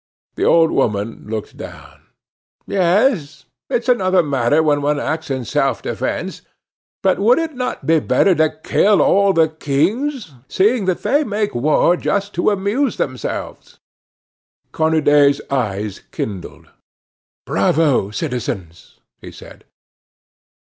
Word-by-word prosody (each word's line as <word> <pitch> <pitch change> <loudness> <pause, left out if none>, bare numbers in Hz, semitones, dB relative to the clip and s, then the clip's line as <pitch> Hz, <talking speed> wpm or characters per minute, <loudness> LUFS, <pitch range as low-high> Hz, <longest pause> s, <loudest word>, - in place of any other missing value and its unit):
The - - -2
old 165 -1 +4
woman 105 -4 -1
looked 110 -1 -6
down: - - -11 0.6
"Yes; 180 - +1 0.2
it's 235 +1 -1
another 185 -7 +3
matter 140 +1 +1
when 145 -2 +1
one 145 0 0
acts 160 +1 -3
in 130 -3 -3
self - - -1
defence; - - -4 0.6
but 190 - +2
would 230 +5 +4
it 325 -1 -2
not 250 -1 -4
be 165 0 +3
better 190 +5 +2
to 160 -2 +2
kill 205 0 +3
all 200 0 +4
the 165 -3 +3
kings, 170 - -2
seeing 210 - +1
that 185 -2 -1
they 290 +2 +2
make 210 -4 -2
war 150 +7 +2
just 200 +2 -2
to 175 - +1
amuse 210 +6 -1
themselves?" 130 -2 -5 0.9
Cornudet's 150 -3 +3
eyes 105 -6 -2
kindled. 100 -4 -7 0.7
"Bravo, 130 +1 +1
citizens!" 105 - -5 0.2
he - - -10
said. - - -14
160 Hz, 120 wpm, -18 LUFS, 135-200 Hz, 0.9 s, old